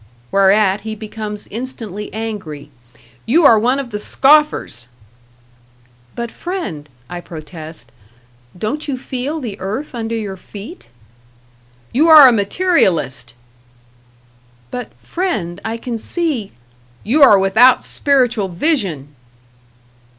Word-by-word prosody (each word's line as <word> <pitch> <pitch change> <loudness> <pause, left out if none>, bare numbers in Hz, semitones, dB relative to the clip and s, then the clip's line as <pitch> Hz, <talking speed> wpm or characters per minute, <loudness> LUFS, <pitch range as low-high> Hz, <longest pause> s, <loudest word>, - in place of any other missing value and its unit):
Whereat 195 0 +3
he 220 +1 -5
becomes 215 -1 -7
instantly 220 -4 -6
angry. 190 -10 -6 0.6
"You 310 +7 +4
are 225 -5 +7
one 250 +5 +1
of 270 -4 -5
the 210 - -3
scoffers!" 285 - +2 1.3
"But, 235 -1 -4
friend," 335 - -5 0.2
I 175 0 -7
protest, 155 -5 -10 0.7
"don't 270 - -3
you 275 -3 -2
feel 265 +4 -4
the 220 -7 -6
earth 215 +11 -4
under 230 -1 -3
your 205 -4 -4
feet?" 210 - -11 1.0
"You 310 +6 +3
are 305 -4 +10
a - - +6
materialist!" 195 - +1 1.4
"But, 245 0 -6
friend, 200 - -3
I 225 +1 -3
can 230 -1 -5
see 290 - -2 0.3
" 120 0 -31
"You 270 +9 +1
are 210 -7 +8
without 215 +7 +4
spiritual 245 -7 +1
vision!" 175 - -1
220 Hz, 115 wpm, -17 LUFS, 190-265 Hz, 1.4 s, are